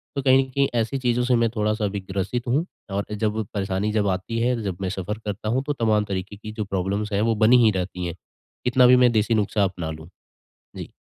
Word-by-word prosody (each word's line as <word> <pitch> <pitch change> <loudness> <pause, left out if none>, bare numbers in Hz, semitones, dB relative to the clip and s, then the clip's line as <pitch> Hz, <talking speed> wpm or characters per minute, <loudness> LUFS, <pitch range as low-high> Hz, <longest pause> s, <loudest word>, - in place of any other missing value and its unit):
तो 140 - -1
कहीं 130 -1 +5
न 130 - -14
कहीं 140 +1 +2
ऐसी 115 +5 -2
चीज़ों 125 -1 +1
से 125 -1 +3
मैं 115 -1 +2
थोड़ा-सा 105 0 0
अभी 100 0 -2
ग्रसित 105 +6 -2
हूँ। 145 +7 +1 0.3
और 100 +1 -1
जब 105 +1 -1
परेशानी 100 +1 -1
जब 105 -2 +1
आती 95 +5 -2
है, 120 -1 +1
जब 95 -4 -3
मैं 95 - -1
सफ़र 100 +2 -4
करता 105 +1 -3
हूँ 130 +3 0
तो 145 - +1
तमाम 110 -4 +1
तरीक़े 100 +1 -5
की 110 +1 -8
जो 110 -1 -4
प्रॉब्लम्स 100 +2 -2
हैं 100 - +1
वो 115 0 +2
बनी 110 +4 +5
ही 110 - +5
रहती 90 -1 -3
हैं, 85 - -4 0.5
कितना 125 0 +5
भी 125 - +7
मैं 125 -1 +5
देसी 110 +1 +1
नुस्ख़ा 105 0 +1
अपना 90 -4 -2
लूँ। 80 +1 -9 0.7
जी। - - -7
105 Hz, 235 wpm, -23 LUFS, 100-120 Hz, 0.7 s, भी